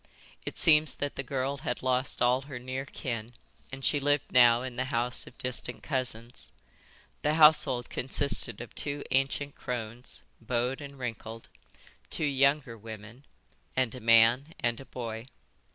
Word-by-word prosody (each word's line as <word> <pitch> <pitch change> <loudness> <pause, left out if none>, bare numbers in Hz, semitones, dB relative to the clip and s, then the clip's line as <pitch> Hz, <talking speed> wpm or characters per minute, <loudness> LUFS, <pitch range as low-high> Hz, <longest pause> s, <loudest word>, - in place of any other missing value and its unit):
It - - -4
seems 155 -2 +6
that 145 0 -3
the - - -2
girl 135 +1 -2
had 125 - -3
lost 130 -1 +1
all 125 +2 +4
her 135 - -5
near 130 +2 -4
kin 115 -4 -5 0.4
and 135 0 -5
she 145 - +3
lived 145 0 +1
now 120 -1 +6
in 130 -2 -6
the 130 +2 -1
house 125 -1 -1
of 125 - -14
distant 125 -1 -3
cousins. 125 -3 -3 0.7
The 150 +1 +1
household 150 -6 +5
consisted 130 -4 0
of 120 - -9
two 145 0 -3
ancient 135 +2 +1
crones, 120 -1 -5 0.2
bowed 125 +4 -1
and 140 -1 -9
wrinkled, 115 -2 -6 0.6
two 160 - -1
younger 140 -2 +2
women, 110 +4 -10 0.5
and 130 -3 +1
a 130 - -7
man 115 +6 +5
and 120 -1 0
a 135 - -10
boy. 115 -2 -6
125 Hz, 150 wpm, -29 LUFS, 120-140 Hz, 0.7 s, seems